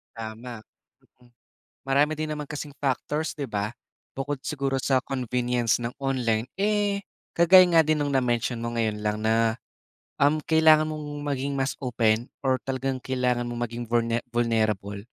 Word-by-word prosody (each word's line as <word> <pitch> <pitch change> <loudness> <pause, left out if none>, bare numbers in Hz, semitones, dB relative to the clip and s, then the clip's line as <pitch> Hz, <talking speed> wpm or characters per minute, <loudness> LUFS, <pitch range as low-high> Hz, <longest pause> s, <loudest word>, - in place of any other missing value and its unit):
Tama. 115 +1 -7 1.3
Marami 145 +3 +2
din 155 - -1
naman 150 -1 -6
kasing 145 -1 -6
factors 145 +3 -1
'di 140 -2 -3
ba? 105 0 -2 0.4
Bukod 135 0 -4
siguro 140 -2 -2
sa 130 0 +2
convenience 125 -3 0
ng 120 0 -4
online, 125 -5 0 0.2
eh, 205 0 +1 0.3
kagaya 180 +2 +7
nga 165 - +7
din 155 -1 +1
ng 145 - -1
na-mention 120 -2 0
mo 115 0 -4
ngayon 110 -2 0
lang 105 0 -1
na, 110 0 +2 0.6
um, 150 +2 +3
kailangan 155 -1 +5
mong 155 -1 -5 0.2
maging 140 -1 -2
mas 135 0 -2
open 115 -2 +1 0.2
or 130 -1 +2
talagang 135 0 -2
kailangan 125 -2 -1
mong 120 0 -3
maging 120 +1 -5
vulne 115 0 +1
vulnerable 110 -4 0
130 Hz, 145 wpm, -26 LUFS, 115-145 Hz, 1.3 s, kagaya